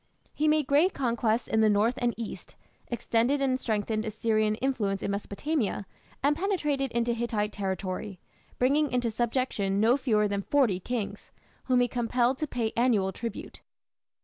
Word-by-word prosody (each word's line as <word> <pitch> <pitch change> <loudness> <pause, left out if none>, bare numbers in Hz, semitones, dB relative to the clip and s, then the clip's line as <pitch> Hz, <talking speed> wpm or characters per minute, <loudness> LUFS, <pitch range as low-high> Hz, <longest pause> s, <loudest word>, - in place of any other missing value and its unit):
He 305 - 0
made 305 -1 +3
great 300 +8 +3
conquests 235 -3 0
in 220 - +2
the 215 - +5
north 210 +3 +3
and 240 -1 0
east, 230 -2 -7 0.3
extended 240 +3 +1
and 260 -2 +1
strengthened 215 -1 -1
Assyrian 215 -1 0
influence 215 -6 -1
in - - -1
Mesopotamia, 205 +2 -2 0.4
and 290 +1 +3
penetrated 300 - -1
into 235 0 +1
Hittite 225 -3 -1
territory, 195 0 -4 0.4
bringing 285 +3 +2
into 245 -2 0
subjection 225 -4 0
no 230 +5 +4
fewer 215 -6 +2
than 200 0 -1
forty 235 -6 +2
kings, 225 +2 -4 0.3
whom 250 -1 +3
he 245 - +3
compelled 245 +2 0
to 305 - -1
pay 230 -5 -2
annual 225 -6 +2
tribute. 230 +1 -7
235 Hz, 150 wpm, -28 LUFS, 210-260 Hz, 0.4 s, the